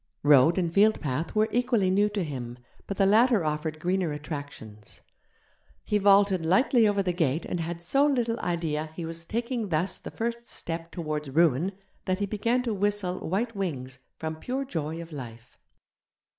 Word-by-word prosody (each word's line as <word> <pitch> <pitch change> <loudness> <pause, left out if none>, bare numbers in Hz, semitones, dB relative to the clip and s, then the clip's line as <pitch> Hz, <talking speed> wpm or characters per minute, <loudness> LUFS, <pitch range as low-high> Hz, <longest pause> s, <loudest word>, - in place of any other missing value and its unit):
Road 145 +3 +6
and 170 -3 0
fieldpath 165 -7 +2
were 215 +1 +3
equally 240 -6 +2
new 205 +2 +3
to 205 -2 -2
him, 125 -6 -6 0.3
but 200 - -4
the 195 - +4
latter 220 -1 +4
offered 155 +1 -2
greener 180 0 0
attractions; 145 -8 -8 0.8
he 210 - +1
vaulted 200 -2 +4
lightly 225 - +4
over 200 -1 +1
the 180 -1 0
gate 160 -3 0
and 175 - -3
had 170 +1 -4
so 275 +11 +3
little 240 -5 0
idea 160 -3 -2
he 170 - -5
was 165 0 -6
taking 235 +1 -2
thus 170 +3 0
the - - -8
first 235 +1 -4
step 165 0 -5
towards 155 -4 -4
ruin 165 +4 +2 0.3
that 185 0 0
he 205 - -1
began 230 +5 0
to 235 -3 -1
whistle 205 -2 -1
'White 220 +7 -2
Wings' 130 -10 -4 0.2
from 160 0 -4
pure 260 +10 -3
joy 160 - -4
of 170 0 -9
life. 120 -4 -9
175 Hz, 170 wpm, -27 LUFS, 155-210 Hz, 0.8 s, Road